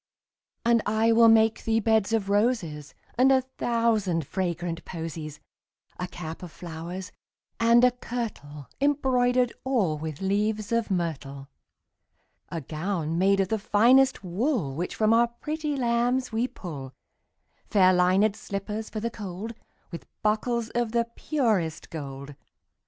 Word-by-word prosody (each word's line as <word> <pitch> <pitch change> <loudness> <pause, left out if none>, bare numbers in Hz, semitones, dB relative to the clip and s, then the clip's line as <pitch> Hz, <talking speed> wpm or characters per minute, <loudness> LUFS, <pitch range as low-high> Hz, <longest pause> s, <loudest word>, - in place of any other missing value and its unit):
And 235 -1 +4
I 220 +2 +3
will 230 0 +6
make 225 0 +4
thee 225 0 +2
beds 220 -1 +2
of 220 -3 0
roses 200 - 0 0.2
And 265 +1 +6
a 260 -1 +4 0.2
thousand 220 -9 +1
fragrant 175 -1 -3
posies; 160 -3 -6 0.6
10 180 - -1
A - - -7
cap 165 -2 -7
of 180 -3 -8
flowers, 175 +3 -7 0.5
and 235 +1 +5
a 250 - +6
kirtle 215 - -6
Embroider'd 255 -4 +2
all 205 - 0
with 155 -2 -5
leaves 210 +3 -1
of 230 -1 +1
myrtle. 140 -7 -3 1.0
A 165 - -4
gown 165 +2 -2
made 195 +1 +3
of 190 - -1
the 220 - 0
finest 250 +5 +4
wool 190 - -1
Which 170 +6 -4
from 215 0 +3
our 235 +1 +5
pretty 300 +5 -4
lambs 245 +1 +1
we 225 +3 0
pull; 140 - -8 0.8
Fair 185 -3 +5
linèd 185 +4 +3
slippers 210 +1 -5
for 215 - -4
the 230 +2 -3
cold, 205 0 -6
15 230 - -18 0.3
With 170 - -11
buckles 225 +2 0
of 235 -2 -1
the 235 0 +2
purest 215 - -1
gold. 140 -3 -7
210 Hz, 140 wpm, -26 LUFS, 170-235 Hz, 1.0 s, will